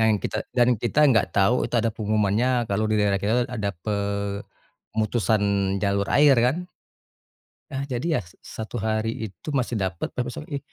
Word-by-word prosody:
Yang 110 0 +4
kita - - -2 0.2
dan 120 -1 +5
kita 120 +4 -1
enggak 120 -8 +4
tahu 100 +4 +4
itu - - -7
ada 115 -1 +1
pengumumannya 110 +3 +1
kalau 100 +2 0
di 110 - +1
daerah 100 -2 +2
kita, 100 +3 0
tuh, - - -6
ada 105 -3 -1 0.2
pemutusan 100 +2 -2 0.4
jalur 100 -1 +1
air, 145 -2 +6
kan. 160 +8 -1 1.1
Ah, 135 +1 -3
jadi 140 +5 -1
ya - - -1
sa 110 +5 -9
satu 115 -2 -5
hari 110 0 -1
itu 95 - -14
masih 120 -4 0
dapat, 95 -3 -2
tapi 125 - -3
besok 125 +5 -6
pagi, 145 -2 -4
110 Hz, 175 wpm, -24 LUFS, 100-125 Hz, 1.1 s, air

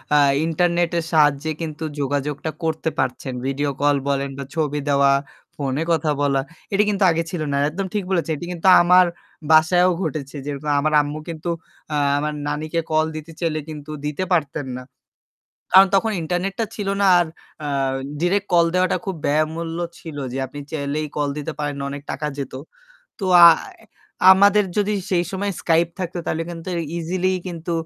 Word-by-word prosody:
আ - - +6 0.3
internet 170 +1 +1
এর - - -3
সাহায্যে 150 0 +3
কিন্তু 160 -1 -5 0.2
যোগাযোগটা 145 +2 -2
করতে 160 0 -1
পারছেন। 130 0 -2
video 140 +1 -1
call 145 0 +4
বলেন 140 0 0
বা 140 - -4
ছবি 150 -2 0
দেওয়া, 140 0 +4 0.4
phone 135 -2 -2
এ - - +1
কথা 155 -2 +1
বলা। 140 -1 +2 0.3
এটি 205 +2 +4
কিন্তু 200 -1 +1
আগে 165 +1 0
ছিল 175 -4 -4
না। 140 - 0
একদম 190 +5 -4
ঠিক 205 -2 -1
বলেছেন। 170 -3 0
এটি 175 - -7
কিন্তু 175 +2 -2
আমার 180 +1 +6 0.5
বাসায়ও 175 +3 +5
ঘটেছে। 150 -4 -4
যেরকম 145 +1 -3
আমার 155 +1 0
আম্মু 145 +1 -5
কিন্তু 165 +1 -5 0.4
আ - - +1 0.2
আমার 150 +1 -1
নানীকে 155 +3 -2
call 155 0 +3
দিতে 155 +1 -7
চাইলে 160 -3 -1
কিন্তু 150 0 -8
দিতে 150 +5 -2
পারতেন 145 -4 0
না। 125 - -8 0.9
কারণ 190 +1 +9
তখন 220 +3 +2
internet 180 +4 -2
টা 225 - +1
ছিল 205 -2 -4
না। - - +4
আর 175 - +2 0.4
আ - - -2 0.5
direct 195 +3 +1
call 170 -1 +6
দেওয়াটা 185 0 +2
খুব 190 -2 -3
ব্যয়মূল্য 160 +3 -1 0.2
ছিল 155 -3 -8 0.2
যে - - -3
আপনি 145 - -9
চাইলেই 150 0 -2
call 145 -1 0
দিতে 150 +2 -4
পারেন 145 -1 -2
না। - - -4
অনেক 140 0 -6
টাকা 150 +2 -4
যেত। 135 -2 -5 0.7
তো 195 - -4 0.2
আয় 355 - +3 0.5
আমাদের 200 +2 +5
যদি 210 0 +1 0.2
সেই 175 -1 +2
সময় 200 +1 -2
Skype 165 0 +2
থাকত 180 -1 -4
তাহলে 165 +1 -1
কিন্তু 165 +1 -8 0.3
easily 185 +3 -1
কিন্তু 170 -1 -5
160 Hz, 175 wpm, -21 LUFS, 145-175 Hz, 0.9 s, কারণ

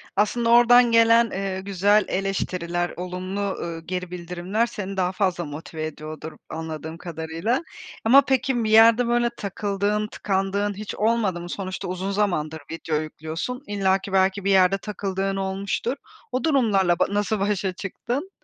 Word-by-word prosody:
Aslında 230 +3 +1
oradan 240 0 +6
gelen, 230 0 +5
eee, 190 -1 -3
güzel 200 +2 +2
eleştiriler, 180 -3 -2
olumlu, 185 +2 -4
ııı, 170 -4 -3
geri 180 -1 -4
bildirimler 180 +5 -2
seni 195 -4 -6
daha 180 -1 +1
fazla 185 -3 0
motive 155 +2 -6
ediyordur 155 +1 -7 0.2
anladığım 160 0 -6
kadarıyla. 165 - -2 0.4
Ama 265 +5 +8
peki, 260 -2 +1
bir 215 - -1
yerde 230 +2 +6
böyle 240 0 +2
takıldığın, 205 +1 -1
tıkandığın 200 0 -1
hiç 210 +1 -6
olmadı 210 -5 +1
mı? 175 - -8
Sonuçta 185 0 -5
uzun 185 +2 -3
zamandır 160 -6 -1
video 165 -1 -3
yüklüyorsun. 160 - -5
İllaki, 195 -1 0
belki 190 +1 +2
bir 200 - +3
yerde 190 0 +5
takıldığın 195 -1 -3
olmuştur. 195 +6 -2 0.4
O 255 0 -1
durumlarla 205 - +2
ba - - +4
nasıl 205 +1 0
başa 195 -2 0
çıktın? 245 - -4
195 Hz, 145 wpm, -24 LUFS, 180-215 Hz, 0.4 s, Ama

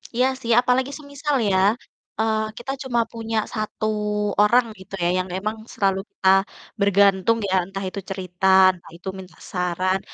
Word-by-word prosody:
Iya 250 +2 +3
sih, 235 - -2
apalagi 255 +2 +1
semisal 285 0 -3
ya, 190 - +2 0.6
eee, 220 -1 0
kita 265 +3 -5
cuma 240 -3 0
punya 225 -1 -4 0.2
1 215 -1 -3 0.6
orang 235 +4 +5
gitu 190 +1 -15
ya, - - +3
yang 185 - -1
memang 215 +3 -2 0.2
selalu 195 -1 +1
kita 190 - -3 0.5
bergantung 200 +1 +4
ya, 190 - +1
entah 195 +1 -6
itu 200 - -6
cerita, 185 -1 -5 0.3
entah 175 -2 -16
itu 175 - -13
minta 180 -4 -12
saran. 185 +1 0
200 Hz, 155 wpm, -23 LUFS, 190-235 Hz, 0.6 s, orang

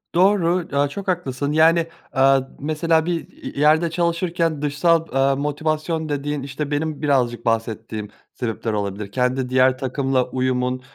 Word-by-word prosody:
Doğru, 180 -2 +3
aaa, 145 0 +3
çok 195 +6 -7
haklısın, 145 -6 -1
yani, 165 +2 +4 0.3
aaa, 135 0 +4 0.2
mesela, 160 +2 +1
bir 175 - 0
i - - -22
i - - -7
yerde 155 +3 +4
çalışırken 170 -2 0
dışsal, 165 +3 +2
aaa, 135 0 +3
motivasyon 155 +2 -2
dediğin, 145 -1 -2
işte, 140 +2 -5
benim 155 0 -2
birazcık 125 -5 +1
bahsettiğim 110 -2 -2 0.2
sebepler 115 -2 -3
olabilir. 100 0 -3
Kendi 125 0 0
diğer 130 0 +3
takımla 130 -1 0
uyumun, 130 0 -1
145 Hz, 145 wpm, -21 LUFS, 130-160 Hz, 0.3 s, yani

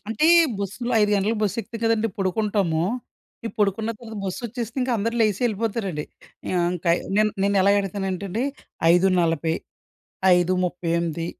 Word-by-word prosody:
అంటే, 225 +8 +1 0.3
బస్సులో 210 +5 -3
5 210 - +2
గంటలకు 210 +3 +1
బస్సెక్కుతాం 220 +3 -3
కదండీ 225 0 +2
పొడుకుంటాము. 190 -4 0 0.6
ఇ - - -1
పొడుకున్న 210 +2 +1
తర్వాత 225 -2 -10
బస్సొచ్చేసిందిక 235 +5 -3
అందరు 230 +3 -1
లేసి 210 -3 +2
యెళ్ళిపోతారండి. 210 -7 -2 0.5
ఆహ్, 180 -1 +2
ఇంకయి 170 -1 +1 0.2
నేన్ 215 0 +4
నేనెలా 200 -1 +3
ఎడతానంటేండి, 195 +3 -3 0.5
5:40, 170 -3 +2 0.8
5:38, 170 -2 0
200 Hz, 110 wpm, -23 LUFS, 180-225 Hz, 0.8 s, నేన్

